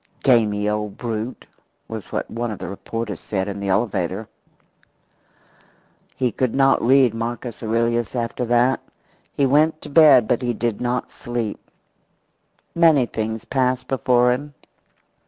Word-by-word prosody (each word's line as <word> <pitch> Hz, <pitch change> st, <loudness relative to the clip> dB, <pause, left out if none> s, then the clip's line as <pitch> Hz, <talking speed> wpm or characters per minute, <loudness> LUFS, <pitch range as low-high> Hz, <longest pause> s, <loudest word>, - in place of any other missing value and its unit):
"Gamey 105 Hz, -5 st, +3 dB
old 105 Hz, -1 st, -2 dB
brute!" 115 Hz, 0 st, -4 dB, 0.4 s
was 110 Hz, -3 st, -8 dB
what -, -, -2 dB
one 120 Hz, +1 st, -4 dB
of 105 Hz, -, -5 dB
the -, -, -7 dB
reporters 105 Hz, 0 st, -5 dB
said 95 Hz, -2 st, -3 dB
in 100 Hz, 0 st, -5 dB
the 100 Hz, -, -4 dB
elevator. 95 Hz, -1 st, -1 dB, 1.9 s
He 125 Hz, -2 st, 0 dB
could 125 Hz, +1 st, -1 dB
not 135 Hz, 0 st, +4 dB
read 130 Hz, -1 st, +4 dB
Marcus 120 Hz, +1 st, -5 dB
Aurelius 115 Hz, 0 st, 0 dB
after 120 Hz, +1 st, -2 dB
that. 120 Hz, +2 st, +2 dB, 0.6 s
He 140 Hz, -, +2 dB
went 155 Hz, +4 st, +3 dB
to 150 Hz, -, -8 dB
bed, 140 Hz, -6 st, +6 dB
but -, -, +1 dB
he 120 Hz, -2 st, -1 dB
did 115 Hz, -2 st, -2 dB
not 125 Hz, 0 st, -2 dB
sleep. 120 Hz, -3 st, -4 dB, 1.1 s
Many 160 Hz, -6 st, +4 dB
things 110 Hz, -1 st, -4 dB
passed 130 Hz, -1 st, 0 dB
before 125 Hz, -1 st, +2 dB
him. 145 Hz, +3 st, -4 dB
120 Hz, 135 wpm, -21 LUFS, 110-130 Hz, 1.9 s, bed